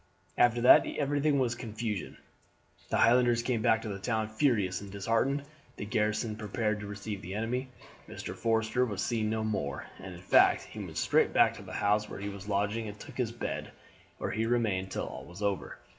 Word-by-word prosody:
"After 120 0 +4
that 125 - +8
everything 145 0 +1
was 125 -3 +1
confusion; 110 -4 -4 0.7
the - - +1
Highlanders 120 0 +4
came 120 -2 0
back 110 +1 +2
into 105 -2 -3
the 100 - -9
town 110 0 -1
furious 110 -7 +1
and 100 -1 -9
disheartened. 115 +8 0 0.3
The - - -5
garrison 105 +1 0
prepared 105 0 -1
to 105 - -6
receive 100 0 -5
the 95 +3 -6
enemy. 125 +4 -2 0.4
Mr. - - -6
Forster 115 +2 +1
was 105 -5 -2
seen 110 -2 0
no 110 0 -1
more, 85 -11 -2
and 95 -1 -8
in 85 - -11
fact 90 - +5
he - - -10
went - - -7
straight - - +3
back - - +5
to - - -9
the - - -10
house 105 +1 +1
where - - -7
he 100 +1 -4
was 100 0 -8
lodging 105 +3 0
and 105 0 -8
took - - -11
his 120 -3 0
bed, 120 - -5 0.4
where - - -3
he 110 +1 -1
remained 105 -6 +1
till - - -3
all 65 - -7
was 90 +8 -9
over. 100 -2 -2
110 Hz, 200 wpm, -30 LUFS, 100-120 Hz, 0.7 s, that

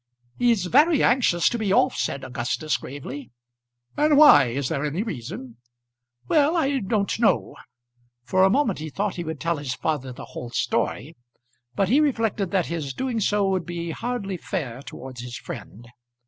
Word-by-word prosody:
"He's 235 -6 +3
very 295 - +4
anxious 200 -9 +3
to 240 - -3
be 210 -3 0
off," 255 +5 +3
said 135 - -2
Augustus 130 +4 -2
gravely. 140 -1 -7 0.7
"And 300 0 +3
why? 290 - +8
Is 130 +3 -2
there 140 -3 -2
any 150 +7 -1
reason?" 130 - -7 0.7
"Well; 305 - +3
I 280 -4 +1
don't 205 -1 -1
know." 230 - +2 0.7
For 185 +8 +2
a 190 - +6
moment 230 - +1
he 155 +1 -5
thought 200 +6 -2
he 175 - -3
would 160 -2 -5
tell 170 -1 -1
his 135 -3 -4
father 130 0 -2
the 120 - -9
whole 120 - -8
story; 135 +5 -1 0.6
but 195 - +2
he 265 +6 +5
reflected 225 - 0
that 185 -1 +1
his 155 -5 -4
doing 255 -3 -2
so 205 -1 +1
would 185 -2 -1
be 170 -1 -4
hardly 205 -2 -3
fair 135 -9 -4
towards 130 -3 -9
his 120 -1 -7
friend. 115 +4 -9
175 Hz, 170 wpm, -24 LUFS, 140-230 Hz, 0.7 s, why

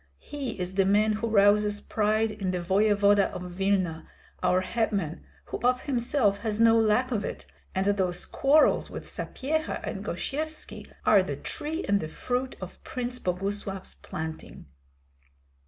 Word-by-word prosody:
He 275 -7 -6
is 180 +1 -3
the 195 0 +3
man 210 +2 +3
who 215 +2 -2
rouses 205 -1 +4
pride 215 +1 +1
in 195 -3 -3
the 180 -1 -1
voevoda 200 +2 +3
of 180 - -5
Vilna, 185 -3 0 0.3
our 185 0 +3
hetman, 195 -5 -1 0.2
who - - -5
of 250 +1 +2
himself 240 -5 +1
has 220 -1 -2
no 230 0 +6
lack 225 +3 +3
of 210 -4 0
it; - - -5 0.3
and 190 +1 +1
those 190 -3 0
quarrels 295 +3 +3
with - - -7
Sapyeha 310 +4 -3
and - - -4
Gosyevski 310 +2 -4
are - - +6
the - - -3
tree 320 +4 -4
and 200 0 +3
the 155 - -4
fruit 250 +10 -3
of - - -9
Prince 250 0 -4
Boguslav's 195 +1 -3
planting." 160 0 -7
210 Hz, 150 wpm, -27 LUFS, 195-245 Hz, 0.3 s, no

